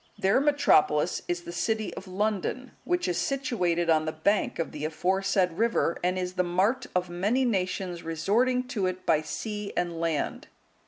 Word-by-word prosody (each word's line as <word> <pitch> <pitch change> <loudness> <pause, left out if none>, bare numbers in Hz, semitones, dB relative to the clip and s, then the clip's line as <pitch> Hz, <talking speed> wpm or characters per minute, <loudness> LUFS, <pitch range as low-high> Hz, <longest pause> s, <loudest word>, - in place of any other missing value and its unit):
Their 195 +7 +3
metropolis 230 - +3
is 175 0 -2
the 170 - -7
city 220 +4 -1
of 190 - -9
London, 210 +6 -2
which 355 0 0
is 175 -1 0
situated 180 -9 0
on 155 -1 +3
the 155 - -1
bank 195 +7 0
of 165 - -2
the 150 - -7
aforesaid 185 +3 +1
river, 230 -7 +2
and 180 +1 +1
is 180 0 -2
the 180 - +1
mart 195 +9 +1
of 180 0 +1
many 205 +9 +1
nations 185 -5 -1
resorting 225 +11 +1
to 205 -7 0
it 185 0 -4
by 155 -2 +3
sea 210 +6 -5
and 170 -2 -1
land. 165 -3 -2
185 Hz, 170 wpm, -27 LUFS, 175-220 Hz, -, Their